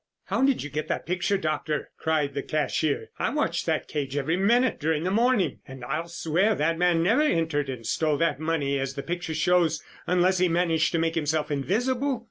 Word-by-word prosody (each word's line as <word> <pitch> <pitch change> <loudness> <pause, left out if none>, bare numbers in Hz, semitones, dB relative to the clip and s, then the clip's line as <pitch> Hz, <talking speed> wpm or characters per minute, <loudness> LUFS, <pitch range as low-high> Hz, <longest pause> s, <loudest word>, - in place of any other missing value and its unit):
"How - - 0
did 270 -1 +2
you 145 - -7
get 150 +2 -3
that - - -2
picture, 180 +3 0
Doctor?" 155 -3 -2
cried 155 -3 0
the 140 - -2
cashier. 155 0 -1
"I - - 0
watched - - -1
that - - 0
cage 140 -2 -3
every 150 +4 0
minute 235 +7 +2
during 155 +1 0
the 185 - 0
morning 230 -1 +2
and 135 -2 -9
I'll 155 +6 -3
swear 170 +5 +1
that 165 +2 0
man 175 -2 +3
never 225 - +3
entered 160 - +1
and 125 -4 -6
stole 155 +4 +1
that 165 -2 +1
money 150 -4 0
as 135 0 -3
the 140 - -4
picture 170 -1 -4
shows, 165 -1 +2 0.2
unless 180 +1 +3
he 185 -1 +3
managed 165 -1 +2
to - - +2
make 165 0 0
himself 155 -1 -1
invisible." 245 - 0
165 Hz, 200 wpm, -26 LUFS, 150-180 Hz, 0.2 s, man